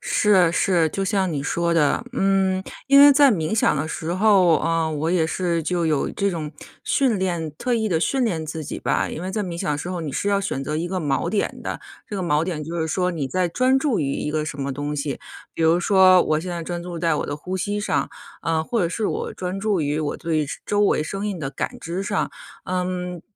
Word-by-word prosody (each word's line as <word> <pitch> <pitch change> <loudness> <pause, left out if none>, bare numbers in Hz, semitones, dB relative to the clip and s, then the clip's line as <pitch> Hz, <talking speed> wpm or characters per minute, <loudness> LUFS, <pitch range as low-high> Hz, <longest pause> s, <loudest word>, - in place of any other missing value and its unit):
是 185 -5 +3
是， 175 -3 +2
就 195 +4 -2
像 190 -3 0
你 140 -2 -2
说 170 +3 0
的。 155 +8 +2
嗯， 195 -4 +1 0.2
因 275 0 +7
为 285 0 +9
在 280 -1 +6
冥 165 0 -1
想 215 - +3
的 145 +3 -2
时 165 +1 -3
候， 185 -5 +4
呃， 165 0 0
我 155 +3 -1
也 170 -3 +2
是 170 -1 -1
就 170 0 0
有 150 -3 0
这 200 -1 0
种 155 -3 -5 0.3
训 255 -8 +2
练 175 -4 -1
特 250 - -2
意 220 -1 0
地 165 -5 +1
训 260 +8 +1
练 165 -8 -1
自 160 0 -5
己 - - -5
吧。 - - 0
因 160 - -6
为 185 - -3
在 210 +1 -1
冥 175 -3 -5
想 150 - -1
的 145 - -2
时 175 - -5
候 180 -1 -3
你 150 -4 -4
是 200 - -1
要 200 -1 +2
选 135 -8 -3
择 150 +3 -3
一 165 +2 -2
个 185 +1 -2
锚 150 +1 0
点 205 - -1
的， - - -4 0.3
这 - - -6
个 190 - -2
锚 150 -2 +1
点 165 -4 -3
就 165 +3 -5
是 160 - 0
说 180 +3 0
你 155 -5 -3
在 180 +6 0
专 255 +8 +2
注 270 -4 0
于 140 -2 -1
一 150 - -3
个 155 0 -1
什 140 -2 -6
么 135 0 -2
东 145 +2 -3
西。 140 -1 -3 0.4
比 165 - -2
如 165 +2 +4
说 185 -1 +6
我 155 0 0
现 180 +2 -5
在 170 -1 -4
专 175 +1 -4
注 175 -1 -6
在 165 -2 +1
我 - - -2
的 145 - -3
呼 185 +5 -5
吸 205 +3 -2
上， - - -1 0.3
呃， 160 -1 0
或 230 +6 -1
者 170 - +1
是 210 +4 -2
我 - - -3
专 185 +1 -4
注 200 -3 0
于 145 +1 -1
我 150 -2 -2
对 160 -3 -1 0.2
周 205 - -2
周 205 - +4
围 195 - +2
声 195 +6 -4
音 200 -3 -3
的 135 -4 -3
感 135 - -4
知 175 +4 -4
上。 200 -1 -1 0.3
嗯， 180 -1 -3
175 Hz, 265 characters per minute, -23 LUFS, 160-195 Hz, 0.4 s, 为